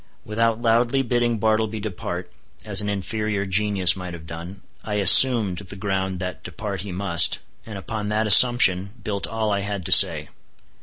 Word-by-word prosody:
Without 115 Hz, +1 st, -3 dB
loudly 120 Hz, +3 st, -1 dB
bidding 120 Hz, -1 st, -3 dB
Bartleby 110 Hz, 0 st, -3 dB
depart—as 95 Hz, +1 st, -3 dB
an 105 Hz, -, -5 dB
inferior 100 Hz, +1 st, -5 dB
genius 100 Hz, -1 st, +1 dB
might 90 Hz, -2 st, -10 dB
have 80 Hz, -1 st, -14 dB
done—I 90 Hz, +5 st, -11 dB
assumed 105 Hz, -1 st, +5 dB
the 100 Hz, 0 st, -11 dB
ground 95 Hz, -2 st, -5 dB
that 90 Hz, 0 st, -8 dB
depart 95 Hz, +1 st, -8 dB
he 100 Hz, 0 st, -9 dB
must; 90 Hz, -2 st, +1 dB, 0.3 s
and 110 Hz, -3 st, -10 dB
upon 105 Hz, +2 st, -8 dB
that 110 Hz, +1 st, -3 dB
assumption 100 Hz, -4 st, +4 dB
built 100 Hz, -2 st, -5 dB
all 110 Hz, -1 st, -5 dB
I 100 Hz, -, -2 dB
had 100 Hz, -2 st, -7 dB
to -, -, -5 dB
say. -, -, +5 dB
100 Hz, 155 wpm, -20 LUFS, 95-110 Hz, 0.3 s, assumed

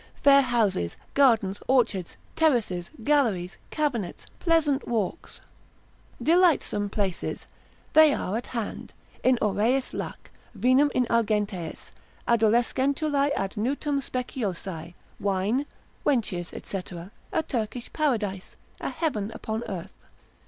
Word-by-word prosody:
Fair 280 Hz, 0 st, +6 dB
houses, 215 Hz, -, +1 dB, 0.2 s
gardens, 225 Hz, -8 st, +3 dB
orchards, 225 Hz, -9 st, +1 dB, 0.2 s
terraces, 235 Hz, -, +1 dB
galleries, 220 Hz, -11 st, +1 dB
cabinets, 250 Hz, -, -2 dB
pleasant 315 Hz, -5 st, +2 dB
walks, 225 Hz, -, -3 dB, 0.8 s
delightsome 320 Hz, -, +3 dB
places, 195 Hz, -4 st, -2 dB, 0.5 s
they 315 Hz, -1 st, +8 dB
are 205 Hz, -7 st, -2 dB
at 235 Hz, -, -3 dB
hand: 230 Hz, -4 st, -5 dB, 0.3 s
in 255 Hz, -1 st, +4 dB
aureis 220 Hz, +6 st, +1 dB
lac, -, -, -6 dB, 0.3 s
vinum 255 Hz, +7 st, +4 dB
in 250 Hz, -, +3 dB
argenteis, 210 Hz, -7 st, -1 dB, 0.4 s
adolescentulae 265 Hz, +6 st, +2 dB
ad 195 Hz, 0 st, -1 dB
nutum 280 Hz, +5 st, -1 dB
speciosae, 190 Hz, -10 st, -4 dB, 0.2 s
wine, 205 Hz, +8 st, 0 dB, 0.4 s
wenches, 200 Hz, -10 st, 0 dB, 0.2 s
&c. 185 Hz, -2 st, -5 dB, 0.4 s
a 320 Hz, -, +1 dB
Turkish 240 Hz, -3 st, -4 dB
paradise, 215 Hz, -, -1 dB, 0.2 s
a -, -, -3 dB
heaven 220 Hz, -11 st, -2 dB
upon 220 Hz, +1 st, -3 dB
earth. 190 Hz, 0 st, -8 dB
230 Hz, 105 wpm, -26 LUFS, 195-275 Hz, 0.8 s, they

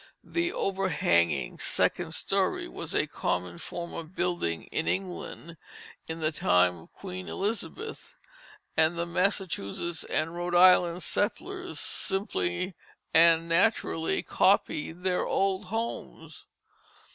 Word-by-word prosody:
The 345 Hz, 0 st, -1 dB
overhanging 145 Hz, -, +1 dB
second -, -, +1 dB
story -, -, 0 dB
was -, -, -6 dB
a -, -, +3 dB
common 90 Hz, -1 st, -2 dB
form 170 Hz, 0 st, -6 dB
of 165 Hz, +2 st, -7 dB
building 175 Hz, -, -1 dB
in 160 Hz, -, -1 dB
England 175 Hz, -3 st, -4 dB, 0.5 s
in 160 Hz, 0 st, -5 dB
the 155 Hz, 0 st, +1 dB
time 90 Hz, -, +3 dB
of 80 Hz, -, -17 dB
Queen 185 Hz, -1 st, -7 dB
Elizabeth, 230 Hz, -, -4 dB, 0.6 s
and 160 Hz, +1 st, +3 dB
the 170 Hz, -, 0 dB
Massachusetts 175 Hz, -, -1 dB
and 165 Hz, +1 st, -1 dB
Rhode 175 Hz, 0 st, -2 dB
Island 180 Hz, -1 st, +6 dB
settlers 365 Hz, -, -2 dB
simply 185 Hz, -, -1 dB, 0.4 s
and 165 Hz, 0 st, +6 dB
naturally 165 Hz, -2 st, +1 dB
copied 180 Hz, -3 st, +1 dB
their 185 Hz, -1 st, +1 dB
old 195 Hz, -1 st, +1 dB
homes. 225 Hz, +5 st, -5 dB
175 Hz, 110 wpm, -28 LUFS, 160-195 Hz, 0.6 s, Island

